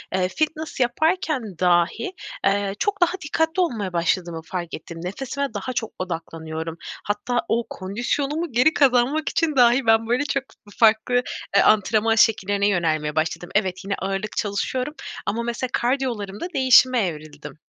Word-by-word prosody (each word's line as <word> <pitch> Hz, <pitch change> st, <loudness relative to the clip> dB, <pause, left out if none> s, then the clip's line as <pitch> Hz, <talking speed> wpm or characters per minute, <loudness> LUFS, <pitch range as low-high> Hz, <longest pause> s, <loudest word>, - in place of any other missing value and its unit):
eee, 185 Hz, -1 st, +2 dB
fitness 310 Hz, +5 st, -3 dB
yaparken 315 Hz, +4 st, +1 dB, 0.2 s
dahi, 180 Hz, -, +2 dB, 0.3 s
eee, 200 Hz, 0 st, +1 dB
çok 405 Hz, -2 st, -1 dB
daha 350 Hz, 0 st, +4 dB
dikkatli 320 Hz, +4 st, 0 dB
olmaya 215 Hz, -, -1 dB
başladığımı 170 Hz, 0 st, 0 dB
fark 175 Hz, -2 st, -5 dB
ettim. 165 Hz, +1 st, -8 dB
Nefesime 270 Hz, +7 st, -4 dB
daha 215 Hz, +5 st, -4 dB
çok 225 Hz, -2 st, -3 dB
odaklanıyorum. 165 Hz, -2 st, -5 dB, 0.3 s
Hatta 210 Hz, +4 st, -1 dB
o 235 Hz, +1 st, +1 dB
kondisyonumu 275 Hz, -, -2 dB
geri 250 Hz, +7 st, +4 dB
kazanmak 275 Hz, +3 st, +3 dB
için 315 Hz, -3 st, 0 dB
dahi 245 Hz, 0 st, +5 dB
ben 225 Hz, 0 st, +4 dB
böyle 245 Hz, +4 st, +1 dB
çok 275 Hz, -2 st, -1 dB
f 205 Hz, -1 st, -20 dB
farklı, 220 Hz, +2 st, +4 dB, 0.4 s
eee, -, -, +7 dB
antrenman 215 Hz, +1 st, +3 dB
şekillerine 205 Hz, -2 st, +3 dB
yönelmeye 155 Hz, -5 st, 0 dB
başladım. 165 Hz, +2 st, -1 dB
Evet, 190 Hz, -3 st, 0 dB
yine 200 Hz, -, -1 dB
ağırlık 195 Hz, +2 st, -3 dB
çalışıyorum 250 Hz, +7 st, -2 dB, 0.3 s
ama 235 Hz, +3 st, -1 dB
mesela 235 Hz, +2 st, -2 dB
kardiyolarımda 240 Hz, -, -1 dB
değişime 255 Hz, -2 st, +5 dB
evrildim. 155 Hz, -1 st, -9 dB
225 Hz, 140 wpm, -23 LUFS, 185-260 Hz, 0.4 s, eee